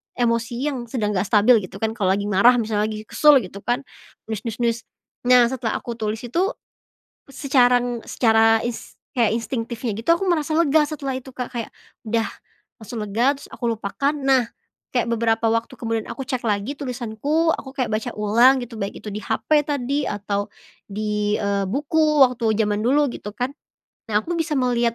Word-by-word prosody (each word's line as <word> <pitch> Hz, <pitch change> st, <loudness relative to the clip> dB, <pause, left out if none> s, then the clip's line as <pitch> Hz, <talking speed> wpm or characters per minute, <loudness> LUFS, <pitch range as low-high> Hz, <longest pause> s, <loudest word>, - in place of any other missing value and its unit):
emosi 230 Hz, -1 st, 0 dB, 0.2 s
yang 250 Hz, -3 st, -5 dB
sedang 220 Hz, -3 st, -1 dB
nggak 195 Hz, 0 st, -1 dB
stabil 220 Hz, +3 st, +5 dB
gitu -, -, -14 dB
kan 220 Hz, -, +1 dB
kalo 190 Hz, -2 st, +2 dB
lagi 200 Hz, -, -2 dB
marah 210 Hz, +6 st, +5 dB
misalnya 215 Hz, -3 st, 0 dB
lagi 215 Hz, 0 st, -5 dB
kesel 300 Hz, +6 st, +5 dB
gitu 195 Hz, +1 st, -9 dB
kan 240 Hz, +6 st, -1 dB, 0.5 s
nulis 220 Hz, -, -2 dB
nulis 225 Hz, -, -3 dB
nulis, 235 Hz, 0 st, +1 dB, 0.5 s
nah 250 Hz, -1 st, +7 dB
setelah 245 Hz, -4 st, -2 dB
aku 235 Hz, -1 st, -5 dB
tulis 215 Hz, 0 st, -2 dB
itu, 335 Hz, +11 st, 0 dB, 0.8 s
secara 260 Hz, -2 st, +3 dB
en 245 Hz, -1 st, -3 dB
secara 225 Hz, -1 st, +3 dB
is 235 Hz, -2 st, -6 dB, 0.2 s
kayak 230 Hz, -3 st, +2 dB
instingtifnya 235 Hz, 0 st, -3 dB
gitu 225 Hz, -, -15 dB
aku 390 Hz, -, -3 dB
merasa 310 Hz, -2 st, 0 dB
lega 315 Hz, -2 st, +4 dB
setelah 285 Hz, -3 st, -4 dB
itu, 260 Hz, -, -13 dB
Kak, 250 Hz, 0 st, -5 dB
kayak, 235 Hz, -3 st, -4 dB, 0.4 s
udah 225 Hz, +1 st, +1 dB, 0.6 s
langsung 225 Hz, +2 st, -7 dB
lega 235 Hz, +7 st, +1 dB
terus 280 Hz, -, -14 dB
aku -, -, -8 dB
lupakan 250 Hz, +8 st, -1 dB
nah, 270 Hz, -4 st, +2 dB, 0.5 s
kayak 245 Hz, -, +2 dB
beberapa 225 Hz, 0 st, +1 dB
waktu 230 Hz, +4 st, -1 dB
kemudian 225 Hz, -2 st, -3 dB
aku 270 Hz, -, -5 dB
cek 255 Hz, -2 st, -3 dB
lagi 205 Hz, +5 st, -1 dB
tulisanku 270 Hz, +5 st, -1 dB
aku 265 Hz, -2 st, -7 dB
kayak 255 Hz, -5 st, -1 dB
baca 215 Hz, 0 st, -1 dB
ulang 230 Hz, +6 st, +5 dB
gitu 230 Hz, -2 st, -10 dB
baik 200 Hz, -, -4 dB
itu 210 Hz, -, -5 dB
di 210 Hz, -, -4 dB
hape 305 Hz, +7 st, +1 dB
tadi 280 Hz, 0 st, -1 dB
atau 205 Hz, 0 st, -2 dB, 0.4 s
di, 210 Hz, 0 st, -1 dB
eee, 200 Hz, -1 st, -1 dB
buku 300 Hz, +4 st, +3 dB
waktu 235 Hz, -4 st, 0 dB
zaman 210 Hz, -1 st, +1 dB
dulu 275 Hz, +5 st, +2 dB
gitu 210 Hz, -, -7 dB
kan, 250 Hz, +2 st, -2 dB, 0.5 s
nah 210 Hz, -2 st, +1 dB
aku 345 Hz, +6 st, -3 dB
bisa 325 Hz, -2 st, -1 dB
melihat, 240 Hz, -3 st, +1 dB
235 Hz, 180 wpm, -22 LUFS, 215-265 Hz, 0.8 s, nah